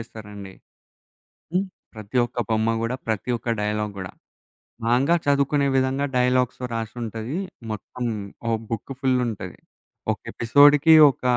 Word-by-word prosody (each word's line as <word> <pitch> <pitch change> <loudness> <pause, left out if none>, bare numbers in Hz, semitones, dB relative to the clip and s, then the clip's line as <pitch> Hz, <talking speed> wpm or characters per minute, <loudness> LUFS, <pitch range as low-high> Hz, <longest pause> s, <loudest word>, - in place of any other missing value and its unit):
ఏస్తారండి. 105 -4 -10 1.0
హ్మ్. 185 +2 +2 0.3
ప్రతి 110 +2 -7
ఒక్క 120 +1 -4
బొమ్మ 110 +1 +2
గూడా 115 +3 -1
ప్రతి 110 +2 -2
ఒక్క 115 - -8
డైలాగ్ 105 0 -1
గూడా. 95 -1 -6 0.7
మాంగా 130 +8 +3
చదువుకునే 140 0 +2
విధంగా 130 +2 +1
డైలాగ్స్‌లో 125 0 +1
రాసుంటది. 115 - -4 0.3
మొత్తం 120 +3 -6 0.4
ఓ - - +1 0.2
బుక్ 115 +3 -4
ఫుల్ 130 -2 +2
ఉంటది. 95 -5 -6 0.5
ఒక - - -4
ఎపిసోడ్‌కి 145 +6 +6 0.2
ఒక - - -23
120 Hz, 120 wpm, -24 LUFS, 110-135 Hz, 1.0 s, ఎపిసోడ్‌కి